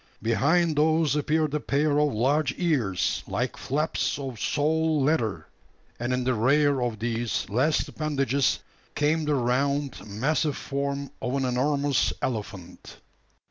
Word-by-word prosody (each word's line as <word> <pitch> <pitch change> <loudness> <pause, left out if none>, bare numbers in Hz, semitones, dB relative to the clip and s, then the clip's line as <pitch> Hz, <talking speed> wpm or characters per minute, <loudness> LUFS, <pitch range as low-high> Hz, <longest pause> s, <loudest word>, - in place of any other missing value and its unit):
Behind 155 +8 +2
those 155 -1 +2
appeared 150 0 +1
a 150 - +1
pair 145 +1 +1
of 150 -1 +2
large 135 +5 +1
ears, 130 - 0
like - - -2
flaps 150 +4 -1
of 135 -5 -6
sole 155 +1 +1
leather; 135 -7 0 0.5
and 120 +2 -2
in 125 0 0
the 130 +1 +1
rear 140 +4 +3
of 120 -3 -1
these 115 +1 -2
last 130 +8 +1
appendages 140 -3 0 0.4
came 155 +2 +1
the 150 -1 +1
round, 140 +2 0
massive 140 +8 0
form 140 0 -3
of 125 - -2
an 135 -1 0
enormous 140 +2 +1
elephant! 100 -7 -5
140 Hz, 135 wpm, -26 LUFS, 125-150 Hz, 0.5 s, rear